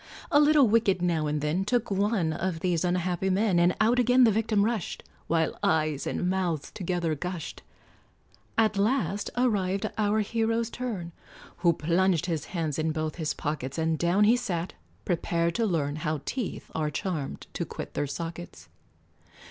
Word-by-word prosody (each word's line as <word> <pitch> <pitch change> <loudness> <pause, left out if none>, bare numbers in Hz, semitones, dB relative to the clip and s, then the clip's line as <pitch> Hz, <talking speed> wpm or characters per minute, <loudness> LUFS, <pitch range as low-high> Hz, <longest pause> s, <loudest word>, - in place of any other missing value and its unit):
A 290 - +6
little 295 -3 +6
wicket 210 -4 +3
now 170 -3 0
and 150 0 -1
then 155 +6 0
Took 240 +1 0
one 195 -4 +1
of 170 0 -3
these 175 -2 +1
unhappy 180 +1 0
men, 190 -1 +2
And 175 +1 +3
out 230 +3 +3
again 250 +1 +5
the 230 - +6
victim 215 -1 +2
rushed, 225 -5 -2 0.2
While 160 -1 0
eyes 155 -3 +1
and 180 - -1
mouth 180 -5 -1
together 175 -3 -1
gushed; 170 +2 -5 1.0
At 220 -2 +3
last 205 - 0
arrived 205 -4 +1
our 215 +1 +2
hero's 225 +1 0
turn, 210 -9 -4 0.5
Who 170 -1 +3
plunged 170 +2 +1
his 160 -4 -2
hands 160 -5 -3
in 160 0 +1
both 155 0 -3
his 160 -3 -2
pockets, 145 -3 -4
And 160 -1 0
down 175 +4 +3
he 220 +3 +6
sat, 185 -8 -3 0.3
prepared 170 0 0
to 230 +3 +1
learn 150 -5 -1
How 155 -1 -2
teeth 250 -6 -4
are 155 -1 -1
charmed 150 -2 -4
to - - -2
quit - - -7
their 145 - -1
sockets. 165 - -7
180 Hz, 165 wpm, -27 LUFS, 160-215 Hz, 1.0 s, A